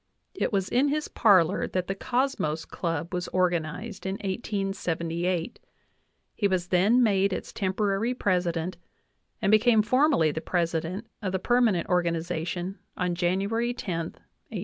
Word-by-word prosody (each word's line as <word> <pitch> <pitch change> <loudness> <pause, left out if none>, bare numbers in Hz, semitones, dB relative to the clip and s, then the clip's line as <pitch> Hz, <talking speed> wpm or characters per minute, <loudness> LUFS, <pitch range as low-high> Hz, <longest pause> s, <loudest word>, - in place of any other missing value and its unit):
It 375 - -1
was 195 -3 0
in 260 +4 +2
his 300 +1 -1
parlor 195 -4 +4
that 185 -1 -2
the 195 - -2
Cosmos 240 - -1
j - - -34
Club 170 0 -3
was 180 0 -2
organized 180 +3 -1
in 190 - -1
1878; 185 -4 -2 0.7
he 205 - +1
was 180 -2 -1
then 205 +8 +4
made 200 -3 +3
its - - -5
temporary! 200 +4 0
president 180 -4 0 0.7
and 195 - +3
became 215 0 +5
formally 255 - +3
the 160 - -4
president 170 +4 -1 0.2
of 190 -3 -2
the 190 - 0
perma 240 0 +3
nent 170 - -1
organization 175 +1 -1 0.2
on 180 -1 0
January 200 +7 0
10, 165 -7 -4 0.4
i88i. - - -3
190 Hz, 145 wpm, -27 LUFS, 175-215 Hz, 0.7 s, became